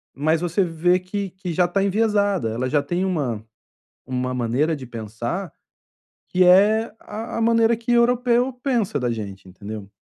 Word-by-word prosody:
mas 155 +3 +1
você 175 +3 +1
vê 175 +1 +2
que 190 +1 -4
que 185 -2 -6
já 180 +2 +3
está 195 +3 0
enviesada, 205 - +1
ela 125 +3 -2
já 145 +1 +2
tem 175 +5 -1
uma 135 - -2 0.9
maneira 125 +7 0
de 130 - -9
pensar, 120 - -5 0.8
que 185 0 +3
é 210 +5 +5
a 225 +2 -6
a - - -1
maneira 230 0 +4
que 235 +1 -3
europeu 245 +1 +3
pensa 240 - -1
da 125 -1 -1
gente 100 -4 -6
entendeu. 100 +2 -8
180 Hz, 155 wpm, -22 LUFS, 130-215 Hz, 0.9 s, é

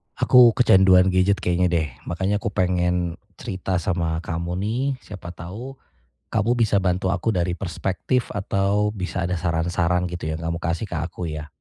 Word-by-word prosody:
Aku 120 -3 +6
kecanduan 95 -5 +5
gadget 95 +2 +2
kayaknya 90 +1 +2
deh, 85 -3 0 0.2
makanya 95 +4 -1
aku 110 - -8
pengen 90 -3 0 0.2
cerita 90 -1 -3
sama 85 -2 -1
kamu 85 +1 -3
nih. 115 +5 -1 0.2
Siapa 90 -4 -9
tahu 105 +11 -8 0.6
kamu 115 +3 +2
bisa 105 -4 +2
bantu 95 +1 0
aku 100 +4 -1
dari 90 -3 0
perspektif 95 +7 -2
atau 100 +1 +1
bisa 95 -2 -4
ada 90 +1 -1
saran-saran 85 +1 0
gitu 85 -2 -5
yang 80 - -6
kamu 85 0 -2
kasih 85 +2 -2
ke 85 - -2
aku 85 +1 -4
ya. 75 -1 -6
90 Hz, 160 wpm, -23 LUFS, 85-100 Hz, 0.6 s, Aku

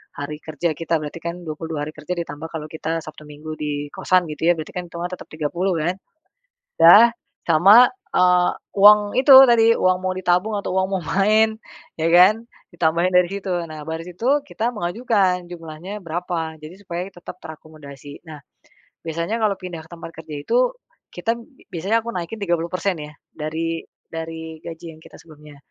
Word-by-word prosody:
hari 145 +1 -6
kerja 155 +2 -3
kita 165 0 -1
berarti 150 +2 -7
kan 170 +1 -6
22 160 -1 -5
hari - - -6
kerja 155 +4 -4
ditambah 160 -2 -6
kalau 155 -1 -5
kita 160 +1 -3
Sabtu 155 0 -11
Minggu 150 +1 -9
di 145 -1 -4
kosan 185 -1 +2
gitu 160 +2 -2
ya 175 - +6
berarti 155 -2 -7
kan 180 - -5
hitungan 170 +1 -5
tetap 185 - -8
30 170 +5 -1
kan. 175 +4 -1 0.9
Udah, 205 +8 +9 0.3
sama, 195 +10 +7 0.3
eee, 180 0 +4 0.3
uang 210 +1 +9 0.2
itu 265 +1 +7 0.2
tadi 230 -1 +5
uang 185 0 +2
mau 185 0 -1
ditabung 185 +3 +1
atau 200 - -3
uang 190 - +2
mau 180 - -4
main 215 +2 +3 0.4
ya 160 - +1
kan 180 +5 +7 0.4
ditambahin 170 +1 +1
dari 180 0 +5
situ 195 0 -5 0.2
nah 155 -1 -8
baris 160 +1 -5
itu 270 +8 +2
kita 230 +2 -2
mengajukan 190 -2 0
jumlahnya 170 +4 -8
berapa 170 -2 -4
jadi 155 +4 -10
supaya 180 -3 -5
tetap 175 +1 -10
terakomodasi. 150 -2 -12
Nah, 155 -3 -10 0.7
biasanya 170 +7 -2
kalau 215 -3 +1
pindah 175 -3 -7
ke - - -21
tempat 165 -1 -9
kerja 160 -1 -9
itu 315 - 0 0.6
kita 180 +6 -1 0.4
biasanya 195 +7 +1
aku 235 - -6
naikin 180 +5 -4
30% 175 +1 -1
ya 150 0 -8 0.2
dari 165 +2 -3 0.3
dari 160 0 -7
gaji 165 0 -9
yang - - -20
kita - - -15
sebelumnya. 150 -2 -15
170 Hz, 170 wpm, -21 LUFS, 160-185 Hz, 0.9 s, Udah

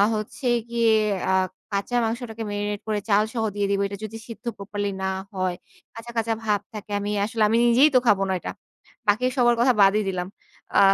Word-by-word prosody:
হচ্ছে 215 +4 -4 0.2
গিয়ে 235 -1 +3 0.4
আ - - +2 0.4
কাঁচা 200 +5 0
মাংসটাকে 225 -1 -4
মেরিনেট 205 0 -3
করে 210 -1 0
চাল 205 +1 +5
সহ 225 -2 -1
দিয়ে 200 -1 0
দিব। 200 - +1
এটা 200 0 -7
যদি 225 +1 -7
সিদ্ধ 230 +2 -10
প্রপারলি 205 0 -3
না 190 - +1 0.2
হয়, 185 -1 -1 0.4
কাঁচা, 235 +1 -8
কাঁচা 225 0 +1
ভাব 205 -2 +1
থাকে। 210 0 -8
আমি 205 +1 -3
আসলে 220 0 0
আমি 225 - +3
নিজেই 250 +6 +6
তো - - +8
খাবো 200 -2 +4
না - - +1
এটা। - - -4 0.6
বাকি 215 +5 +3
সবার 240 -1 +4
কথা 250 +1 +5
বাদই 200 +2 +5
দিলাম। 180 -1 -3 0.5
আ - - +6
215 Hz, 190 wpm, -24 LUFS, 200-230 Hz, 0.6 s, তো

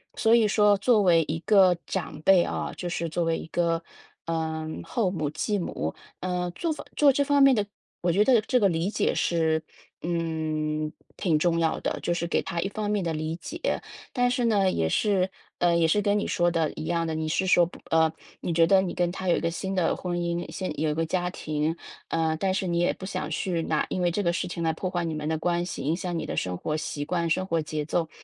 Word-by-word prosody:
所 225 0 +3
以 225 -2 +4
说 210 0 +4
作 220 +2 +3
为 170 -3 +5
一 160 - -1
个 190 -4 +6
长 155 -5 -4
辈 190 -3 +6
哦， - - -3
就 180 - -4
是 170 -1 -2
作 170 +2 -1
为 165 0 +1
一 - - -7
个， 165 -1 0 0.4
呃， 160 -1 -2 0.2
后 210 -7 0
母、 155 -5 -2
继 195 +7 -1
母， 80 - -3 0.3
呃， 180 -1 -1
做 335 -2 -1
法 - - -8
做 290 -2 +6
这 285 +2 +2
方 285 0 +3
面 275 -1 +7
的 210 -2 +1 0.4
我 175 -1 +2
觉 200 +5 +4
得 250 -2 +5
这 250 +4 +1
个 200 - +4
理 170 +3 0
解 - - 0
是， 160 -2 +1 0.4
嗯， 155 -2 -2 0.3
挺 165 -6 +2
重 170 +1 +2
要 160 -1 +1
的， - - -2
就 175 - 0
是 170 0 -2
给 - - +1
她 170 - -4
一 195 - -1
方 210 0 -3
面 205 -2 0
的 165 - -1
理 155 +1 -3
解， 310 - -3 0.3
但 245 -1 +2
是 250 0 0
呢， 200 -4 +3
也 80 - 0
是， 190 - +2 0.3
呃， 175 -1 +3
也 165 -1 +3
是 205 +6 +3
跟 205 0 +2
你 - - -2
说 175 0 +2
的 165 -3 0
一 155 - -6
样 170 0 0
的， 160 - -2
你 155 0 -2
是 190 +4 0
说 175 -1 +5
不 175 - -11
呃， 160 -1 +4 0.3
你 - - -2
觉 165 0 +4
得 190 +1 +5
你 185 - -3
跟 175 -1 +1
他 185 0 -3
有 170 - +4
一 - - 0
个 165 - 0
新 190 +3 -4
的 180 -3 +1
婚 175 -1 -3
姻， 170 0 -2
新 185 -5 -4
有 155 - +2
一 - - 0
个 165 +2 0
家 180 +2 -1
庭， 155 -1 -2 0.3
呃， 160 -1 +1
但 190 +2 0
是 190 0 -1
你 170 -1 0
也 175 - +3
不 190 - -8
想 185 -1 -4
去 175 -3 -1
拿 155 -1 0
因 185 - -2
为 175 -1 +2
这 205 - -1
个 170 -2 +1
事 180 - -2
情 170 - -5
来 160 -1 +1
破 185 +3 -3
坏 175 -1 -2
你 165 - -2
们 150 0 -3
的 160 - 0
关 175 +1 0
系， - - -5
影 155 +4 +1
响 180 -2 -3
你 - - -4
的 - - -4
生 90 -1 -2
活 150 - -2
习 150 -2 -3
惯、 170 +1 -1
生 185 +3 +1
活 165 -2 +1
节 150 -1 -3
奏。 160 0 -1
175 Hz, 270 characters per minute, -26 LUFS, 160-190 Hz, 0.4 s, 面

